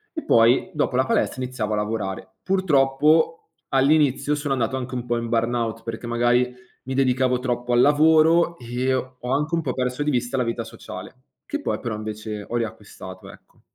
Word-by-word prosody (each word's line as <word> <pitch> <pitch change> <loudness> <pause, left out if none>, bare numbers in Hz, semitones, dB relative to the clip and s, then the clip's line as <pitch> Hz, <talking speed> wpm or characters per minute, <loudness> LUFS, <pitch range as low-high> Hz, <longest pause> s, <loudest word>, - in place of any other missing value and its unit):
E 315 - -4
poi 115 +9 +4
dopo 145 -4 -1
la 130 +1 +3
palestra, 130 - 0
iniziavo 120 -4 -3
a - - +2
lavorare. 105 -2 -3
Purtroppo 160 -3 +2 0.2
all'inizio, 145 +1 +3
sono 145 -1 -2
andato 130 0 -1
anche 130 0 -6
un 125 -1 -4
po' 120 0 0
in 115 0 -3
burnout, 115 -1 -1
perché 115 +1 -6
magari 120 +1 +2 0.3
mi 130 - -5
dedicavo 130 -1 +2
troppo 125 -1 -2
al 120 - +5
lavoro 160 +4 +4
e 125 +2 -1
ho 130 0 -3 0.2
anche 150 +4 0
un 165 - 0
po' - - -2
perso 125 +2 -2
di 150 - 0
vista 125 0 -1
la 125 - +2
vita 115 0 -2
sociale, 110 -4 -10 0.3
che 295 - -3
poi - - -2
però 115 -3 -4
invece 105 -1 -6
ho 120 - -4
riacquistato, 105 -5 -7
ecco. - - -21
125 Hz, 185 wpm, -23 LUFS, 115-145 Hz, 0.3 s, al